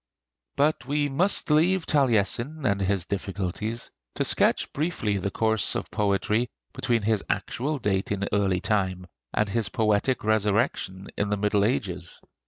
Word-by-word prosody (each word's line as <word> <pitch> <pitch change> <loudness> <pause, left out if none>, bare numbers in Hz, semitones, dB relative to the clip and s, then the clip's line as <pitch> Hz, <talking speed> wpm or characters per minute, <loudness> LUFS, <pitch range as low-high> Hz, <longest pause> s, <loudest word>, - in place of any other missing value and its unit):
But 145 -3 +1
we 145 +1 +1
must 170 +3 +1
leave 170 +4 +3
Taliesin 135 +2 +1
and 100 -3 +1
his 95 -2 0
difficulties, 100 +3 -3 0.2
to - - 0
sketch - - +3
briefly 140 - -1
the 100 - -2
course 110 0 +1
of - - -4
poetry 105 +3 +1 0.2
between 120 -4 0
his 110 -1 +1
actual 145 +5 -1
date 100 -6 -1
in 100 0 -1
early 95 -3 +2
time 95 -4 0 0.3
and 105 - +1
his 110 0 -1
poetic 110 +4 +1
resurrection 105 -2 0
in 100 - 0
the 105 - 0
Middle 105 0 +2
Ages. 95 -7 -2
105 Hz, 145 wpm, -26 LUFS, 100-130 Hz, 0.3 s, leave